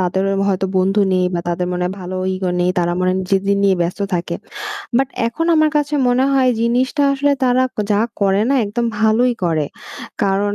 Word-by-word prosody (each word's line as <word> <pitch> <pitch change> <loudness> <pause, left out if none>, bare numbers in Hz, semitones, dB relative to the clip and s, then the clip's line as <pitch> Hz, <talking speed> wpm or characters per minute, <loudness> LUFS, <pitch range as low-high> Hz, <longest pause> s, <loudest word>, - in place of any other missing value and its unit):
তাদের 185 +1 0
অ - - 0
হয়তো 190 0 0
বন্ধু 195 +3 +2
নেই 185 0 +2
বা 170 - 0
তাদের 175 +1 -1
মনে 180 0 -2
হয় 180 +2 -2
ভালো 185 +1 -5 0.2
ইগো 185 -1 -2
নেই। 180 +1 +2
তারা 175 0 +1
মনে 185 - +1
হয় 185 - 0
নিজেদের 195 +1 +1
নিয়ে 195 -1 +4
ব্যস্ত 175 +4 -3
থাকে।" 170 0 -2 0.6
বাট 270 0 +2 0.2
এখন 330 +8 -3
আমার 310 -1 +3
কাছে 295 0 0
মনে 250 +2 +2
হয় 265 -2 +3
জিনিসটা 250 +5 +1
আসলে 285 +1 +1
তারা 250 +1 +3 0.3
যা 205 - +3 0.2
করে 195 0 +2
না, 275 - +2
একদম 235 +4 -2
ভালোই 220 +3 +3
করে। 160 -3 +1 0.6
কারণ 200 +1 0
200 Hz, 200 wpm, -18 LUFS, 185-250 Hz, 0.6 s, নিয়ে